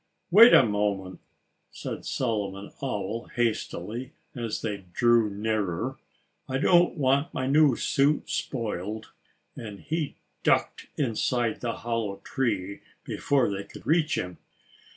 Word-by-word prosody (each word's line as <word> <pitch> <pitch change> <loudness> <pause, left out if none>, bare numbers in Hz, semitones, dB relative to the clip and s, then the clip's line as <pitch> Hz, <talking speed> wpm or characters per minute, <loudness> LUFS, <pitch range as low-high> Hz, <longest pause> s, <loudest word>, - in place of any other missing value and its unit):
_" - - -48 0.3
"Wait 225 +6 +10
a - - +8
moment!" 100 -3 -1 0.5
said - - -6
Solomon 100 -5 -2
Owl 115 -3 -3
hastily, 120 +1 -2 0.2
as 115 -4 -4
they 105 -3 -2 0.2
drew 120 -3 +4
nearer. 105 +3 -2 0.5
"I 130 - 0
don't 175 +4 +4
want 140 +3 +2
my 130 - -1
new 145 -1 +5
suit 140 +5 +1
spoiled." 110 -3 -3 0.4
And 105 -3 -8
he 160 -2 -3 0.3
ducked - - +1
inside 120 -2 0
the 120 -1 -1
hollow 115 -4 -2
tree 100 -7 -2 0.2
before 135 -4 +1
they 100 0 -3
could - - -13
reach 160 0 +2
him. 90 -1 -4
115 Hz, 125 wpm, -27 LUFS, 105-135 Hz, 0.5 s, Wait